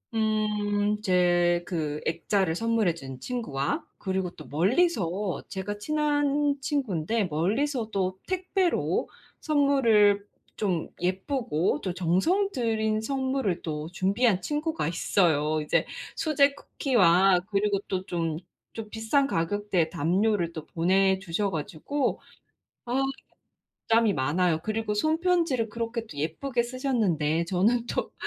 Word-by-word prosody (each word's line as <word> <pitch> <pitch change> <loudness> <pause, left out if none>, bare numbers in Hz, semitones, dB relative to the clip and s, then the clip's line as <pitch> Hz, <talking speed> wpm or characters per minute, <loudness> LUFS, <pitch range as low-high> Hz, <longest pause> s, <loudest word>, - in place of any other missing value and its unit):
음, 210 -1 0
제 175 -2 +3
그 150 -4 -3
액자를 175 +1 0
선물해 225 -5 +1
준 135 -5 -9
친구와 145 - -3
그리고 190 -2 -2
또 155 - -12
멀리서 195 - +1
제가 195 +1 -4
친한 290 +2 +1
친구인데 225 - -1
멀리서 220 - -1
또 185 -1 -1
택배로 370 -1 0 0.3
선물을 235 -9 +3 0.3
좀 185 -6 -1
예쁘고 185 - -1
또 185 -2 -3
정성 190 - +1
들인 220 - 0
선물을 260 -6 -1
또 155 -1 -4
준비한 195 +2 +1
친구가 300 - -2
있어요. 155 -3 +1
이제 150 - +1 0.3
수제 285 -3 +3
쿠키와 190 -10 +3
그리고 200 0 +1
또 190 -1 -2
좀 165 -4 -2 0.4
좀 225 -2 -7
비싼 225 +6 +1
가격대에 180 - 0
담요를 180 +2 +1
또 160 -2 -7
보내주셔 190 +2 +1
가지고 165 - -2 0.7
아 250 +3 0 0.9
부담이 225 -2 +4
많아요. 160 +5 +1
그리고 215 0 -2
손 310 +10 +1
편지를 335 -11 +1
그렇게 230 +1 -3
또 150 - -12
예쁘게 235 - -1
쓰셨는데 210 - 0
저는 220 +7 +1
또 - - -3
205 Hz, 250 characters per minute, -27 LUFS, 175-245 Hz, 0.9 s, 부담이